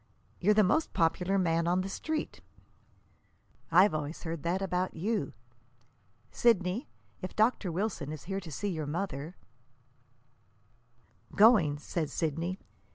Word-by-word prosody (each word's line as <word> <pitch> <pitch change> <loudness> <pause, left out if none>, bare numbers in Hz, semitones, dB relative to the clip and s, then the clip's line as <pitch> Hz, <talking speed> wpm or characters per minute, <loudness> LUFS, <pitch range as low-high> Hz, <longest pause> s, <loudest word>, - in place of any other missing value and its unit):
You're 210 +3 +3
the 215 - +6
most 310 - +1
popular 180 +3 +1
man 170 -2 +1
on 180 +2 +2
the 190 - -4
Street." 310 +10 -4 1.3
"I've 185 +4 +6
always 150 +1 -4
heard 165 -2 -4
that 175 +4 0
about 185 -1 -1
YOU. 195 - -1 1.0
Sidney, 215 - +2 0.3
if 185 - -6
Dr. 215 -4 +2
Wilson 185 -4 -2
is 155 -3 -7
here 195 +2 -3
to 175 -4 -10
see 205 +8 -3
your 160 -5 -3
mother 160 -1 -4 1.0
" 115 -1 -27
"Going," 200 -10 +6
said 155 +1 -3
Sidney. 165 +4 -2
180 Hz, 130 wpm, -30 LUFS, 155-195 Hz, 1.3 s, the